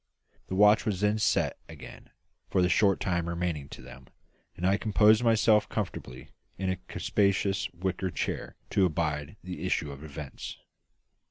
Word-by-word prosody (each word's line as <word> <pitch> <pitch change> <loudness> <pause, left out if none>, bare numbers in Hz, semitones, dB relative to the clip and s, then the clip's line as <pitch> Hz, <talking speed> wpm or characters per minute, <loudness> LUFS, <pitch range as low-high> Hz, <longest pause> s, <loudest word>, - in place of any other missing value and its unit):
The 95 - -3
watch 105 +3 +6
was 100 -3 -2
then 105 +1 +2
sent - - +2
below - - -10
again - - -12 0.4
for 95 - +2
the 90 - +2
short 100 0 +3
time 85 -2 -1
remaining 85 -5 -3
to - - -10
them, 65 0 -13 0.5
and 90 - -3
I 95 +1 +4
composed 110 +1 +4
myself 110 -2 +4
comfortably 90 - -5 0.3
in 95 0 -1
a 95 - -2
capacious 100 -1 0
wicker 95 +1 -2
chair - - -4 0.2
to 100 -2 +4
abide 75 0 -2
the 90 -2 -6
issue 80 -5 -1
of 70 +1 -10
events. 75 -2 -8
95 Hz, 160 wpm, -28 LUFS, 85-105 Hz, 0.5 s, watch